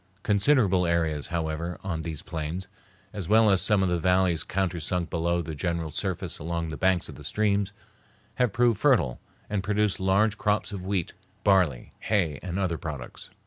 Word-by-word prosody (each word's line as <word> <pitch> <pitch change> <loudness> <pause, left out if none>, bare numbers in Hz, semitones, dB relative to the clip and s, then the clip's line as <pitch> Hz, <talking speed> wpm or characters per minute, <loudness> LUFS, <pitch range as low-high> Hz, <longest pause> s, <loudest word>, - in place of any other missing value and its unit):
Considerable 100 -4 +3
areas, 80 -3 0
however, 85 0 -3
on 85 -5 -2
these 80 -2 -6
plains, 85 +2 -4 0.5
as 95 -5 -5
well 110 0 +6
as 95 - +3
some 105 -2 +3
of 95 - +1
the 90 -1 +1
valleys 90 -1 +2
countersunk 90 -2 -1
below 85 +1 0
the 80 0 -5
general 85 +1 -2
surface - - -3
along 85 +1 -3
the 80 - -4
banks 95 +1 +1
of - - -9
the - - -12
streams, 100 -2 +1 0.7
have 125 -4 +2
proved 115 -1 +2
fertile 110 - +3 0.3
and 105 -2 -1
produce 105 0 0
large 100 +3 +2
crops 105 0 0
of 100 -3 -5
wheat, 95 -3 -2 0.3
barley, 90 -11 +2
hay, 85 -10 0
and 90 0 -4
other 90 -4 -1
products. 70 -6 -6
90 Hz, 170 wpm, -27 LUFS, 85-100 Hz, 0.7 s, well